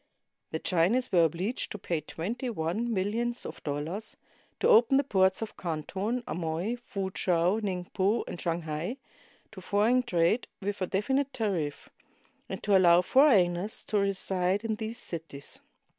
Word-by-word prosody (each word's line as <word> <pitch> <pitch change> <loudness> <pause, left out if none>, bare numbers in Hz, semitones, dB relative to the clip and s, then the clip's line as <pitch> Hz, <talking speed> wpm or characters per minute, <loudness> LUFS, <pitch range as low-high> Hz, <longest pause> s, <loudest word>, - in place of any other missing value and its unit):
The 160 - -2
Chinese 185 +11 +1
were 170 -3 +5
obliged 180 - -2
to - - -4
pay 170 -4 -2
twenty 215 - -4
one 215 +4 -2
millions 230 +4 -1
of - - -7
dollars, 155 +9 -4 0.4
to - - +2
open 245 +4 +6
the 280 - +3
ports 190 -4 +2
of 220 - -8
Canton, 190 - -3
Amoy, 170 +6 -2
Foo 195 -5 -4
chow, 180 +3 +2
Ningpo, 195 +2 -1
and 175 - -5
Shanghai 165 - -2 0.5
to 205 -3 -10
foreign 215 +7 +3
trade 210 -1 +1
with 200 0 -4
a 185 - 0
definite 265 +9 0
tariff, 180 - -2 0.6
and - - -6
to 200 -1 +3
allow 175 -1 +6
foreigners 205 -8 +3
to 210 - 0
reside 195 0 0
in 220 -1 -1
these 220 +1 -5
cities. 165 - -7
195 Hz, 145 wpm, -29 LUFS, 170-225 Hz, 0.6 s, open